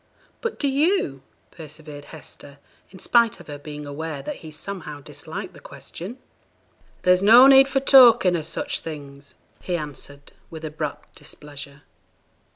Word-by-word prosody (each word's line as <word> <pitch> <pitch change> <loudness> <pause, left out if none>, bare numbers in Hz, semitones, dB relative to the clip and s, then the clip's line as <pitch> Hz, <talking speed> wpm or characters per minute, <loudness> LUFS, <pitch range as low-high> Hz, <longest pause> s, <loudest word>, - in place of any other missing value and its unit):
'But 465 0 -3
do 285 - -1
you?' 280 - +1 0.3
persevered 150 -2 -11
Hester, 145 -2 -13 0.3
in 190 - -14
spite 235 +3 +2
of - - -13
her 145 -1 -8
being 150 0 -8
aware 145 0 -6
that - - -5
he 160 - -11
somehow 155 -1 -8
disliked 140 - -8
the - - -14
question. 200 +9 -9 0.9
'There's 180 0 +4
no 230 +6 +8
need 270 0 +8
for 270 0 0
talking 240 -9 +7
o' 165 - -1
such 160 +2 -4
things,' 140 -3 -10 0.3
he 180 -1 -2
answered, 145 -2 -9 0.2
with 160 -1 -8
abrupt 150 -1 -6
displeasure. 145 -1 -11
160 Hz, 145 wpm, -23 LUFS, 145-225 Hz, 0.9 s, no